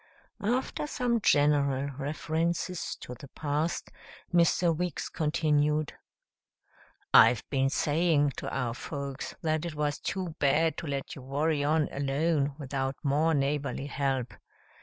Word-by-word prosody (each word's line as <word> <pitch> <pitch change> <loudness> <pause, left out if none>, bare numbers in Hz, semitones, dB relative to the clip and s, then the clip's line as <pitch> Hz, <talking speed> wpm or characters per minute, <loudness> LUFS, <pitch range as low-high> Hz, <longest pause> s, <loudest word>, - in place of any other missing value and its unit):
After 255 +6 -1
some 245 -5 0
general 145 -3 +3
references 160 +5 -2
to 125 - -7
the 130 +3 -11
past, 150 +4 -2 0.4
Mr. 170 0 +4
Weeks 175 -1 -3
continued, 150 -1 +1 1.2
"I've 120 - +7
been 135 -1 +2
saying 150 0 +2
to - - -4
our 125 -3 -1
folks 140 +1 -5
that 155 -1 0
it 170 -3 -4
was 150 -1 -1
too 185 -4 -3
bad 155 +3 +3
to 170 - -5
let 140 -1 -3
you 135 - -9
worry 145 +3 0
on 150 +1 +2
alone 140 +1 0
without 135 -2 -2
more 150 +3 +2
neighborly 140 0 -1
help. 135 -3 -1
150 Hz, 125 wpm, -29 LUFS, 140-160 Hz, 1.2 s, I've